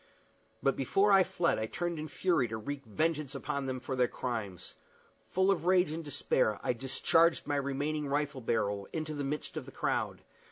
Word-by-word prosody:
But 135 - +3
before 195 +10 +3
I 195 -1 +7
fled 170 -6 0
I 110 - -1
turned 175 +5 -3
in 155 - -4
fury 165 -4 +1
to 110 0 -4
wreak 140 +5 -5
vengeance 155 +3 0
upon 140 -2 -3
them 130 -1 -2
for 130 +1 -4
their 125 -1 +3
crimes. 110 -9 -4 0.6
Full 190 +1 +3
of 175 -2 -1
rage 180 -4 +4
and 165 +1 -4
despair, 130 -7 +1
I - - +1
discharged 155 +7 +2
my 145 -1 0
remaining 145 +2 -1
rifle 145 -1 -1
barrel 100 -4 0
into 155 -1 -3
the 145 -1 -3
midst 145 +2 -3
of - - -5
the - - -9
crowd. - - -1
145 Hz, 190 wpm, -32 LUFS, 125-165 Hz, 0.6 s, I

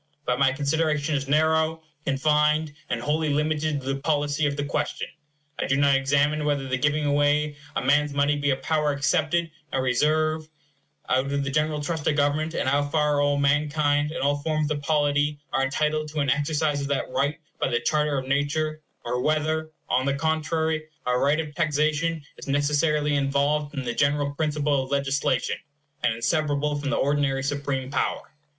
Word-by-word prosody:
But 125 +1 0
my 135 -1 +4
consideration 150 +2 0
is 140 -1 -1
narrow, 160 +2 +2 0.2
confined, 150 +2 +2 0.2
and 120 - -1
wholly 150 +5 0
limited 150 0 0
to 135 +1 -2
the 135 - -5
policy 145 0 +1
of 145 0 -3
the 145 - -1
question. - - -2 0.5
I - - -1
do 135 - +2
not 140 -1 +4
examine 145 +3 +2
whether 145 -2 0
the 130 0 -1
giving 145 +2 +1
away 145 +1 +2 0.2
a - - -1
man's 145 +2 +3
money 140 +1 +2
be 145 0 0
a 135 - +3
power 150 +2 0
excepted 160 +3 +1 0.2
and 130 - 0
reserved 155 +4 +1 0.6
out 130 +2 +1
of 140 0 0
the 140 - -3
general 150 +1 0
trust 160 -1 -3
of 150 - +3
government, 150 +3 +1
and - - -1
how 145 +2 +2
far 150 -1 +2
all 145 0 +2
mankind, 145 +1 +2
in 160 - -3
all 145 +1 +2
forms 155 0 -1
of 145 -1 -2
polity, 145 0 +1 0.2
are 135 - +2
entitled 155 +3 0
to 150 0 -4
an 140 -2 +2
exercise 150 0 0
of 140 - -3
that 140 -2 -2
right 140 +3 0 0.2
by - - +1
the 120 - +1
charter 150 -2 +1
of 130 0 -4
nature; 155 +3 0 0.2
or 125 +1 -1
whether, 155 +2 0 0.2
on 130 +2 +1
the 140 - +1
contrary, 160 +1 0 0.2
a 125 - +1
right 140 +5 +2
of 155 -2 -4
taxation 155 +2 0
is - - -10
necessarily 150 +1 +1
involved 145 +2 0
in 135 - -3
the 120 -1 -2
general 145 +1 +1
principle 150 -2 0
of 130 - -9
legislation, 140 0 0 0.4
and 120 -2 +1
inseparable 145 +3 0
from 145 -1 -3
the - - 0
ordinary 140 -1 +1
supreme 140 -2 -2
power. 135 - -2
145 Hz, 185 wpm, -25 LUFS, 140-155 Hz, 0.6 s, my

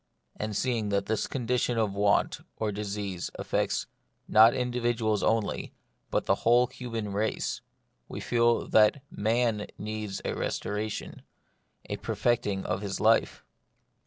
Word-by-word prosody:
And 105 -1 -4
seeing 115 -5 0
that 100 0 0
this 110 0 -1
condition 125 -1 0
of 110 -3 +1
want 100 0 +2 0.2
or 110 -1 -1
disease 100 -3 -4
affects - - -1 0.4
not 110 +2 +7
individuals 120 -4 0
only, 110 -2 0 0.3
but - - 0
the - - +4
whole 120 +2 +5
human 115 -5 -5
race, 105 +2 -1 0.5
we - - -6
feel 120 0 +2
that 110 +5 +4
Man 110 0 0
needs 105 -2 -4
a - - -1
restoration, 105 +1 -3 0.7
a - - -3
perfecting 105 -5 0
of 90 +2 -1
his 100 -2 -3
life. 110 +1 +2
110 Hz, 130 wpm, -28 LUFS, 105-120 Hz, 0.7 s, not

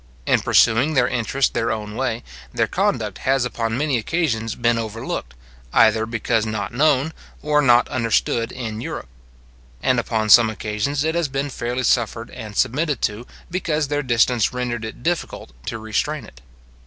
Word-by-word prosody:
In - - +3
pursuing 130 +8 +3
their 125 -2 +4
interest 125 +3 0
their 115 -1 0
own 105 -1 -4
way, 120 -2 -2 0.3
their - - +1
conduct - - -1
has 135 -1 +1
upon 115 -1 -2
many 140 -3 +1
occasions 115 -5 -1
been 120 -1 +1
overlooked, 110 - -5 0.4
either 110 0 +4
because 115 0 0
not 110 -2 -3
known 145 +2 +2 0.3
or 150 0 +3
not 120 -3 +5
understood 115 -2 0
in 115 -3 -5
Europe; - - -6 0.7
and 130 -2 +3
upon 110 -2 -1
some 115 0 +8
occasions 110 +7 -2
it 160 +1 0
has 170 -2 0
been 140 +1 -3
fairly 125 +1 -3
suffered 115 -1 0
and 110 -4 -8
submitted 145 +1 +1
to, 105 +4 -2 0.2
because 155 -5 -1
their 145 0 0
distance 120 -3 +2
rendered 125 -2 -3
it 110 +2 -9
difficult 170 - -2 0.2
to 115 - -3
restrain 110 +5 -2
it. 65 - -16
120 Hz, 160 wpm, -21 LUFS, 110-135 Hz, 0.7 s, some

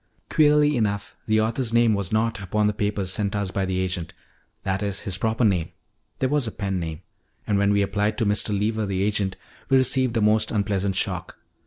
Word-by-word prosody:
"Queerly 150 -1 +4
enough, 105 -3 -1
the 110 0 +3
author's 115 +2 0
name 115 -1 +4
was 100 -4 -2
not 110 0 0
upon 105 +2 0
the 105 - +2
papers 100 -2 -1
sent 100 +1 -1
us 100 -2 -2
by 95 0 -1
the 95 0 -1
agent 90 -3 -3 0.5
that 95 0 -1
is, 100 -2 -3
his 95 - -3
proper 110 +3 +1
name; 90 -6 +1 0.5
there 130 - +1
was 145 -2 +1
a - - -3
pen 95 -3 -3
name. 80 -1 -5 0.4
And 100 -2 +1
when 100 0 +3
we 100 0 +3
applied 105 +2 0
to 115 - +1
Mr. 105 +1 +1
Lever, 105 +1 0
the 95 -1 -1
agent, 100 -2 0 0.3
we 135 - +5
received 130 -2 +2
a - - +3
most 105 +1 +3
unpleasant 100 -2 0
shock. - - -2
105 Hz, 205 wpm, -24 LUFS, 95-110 Hz, 0.5 s, we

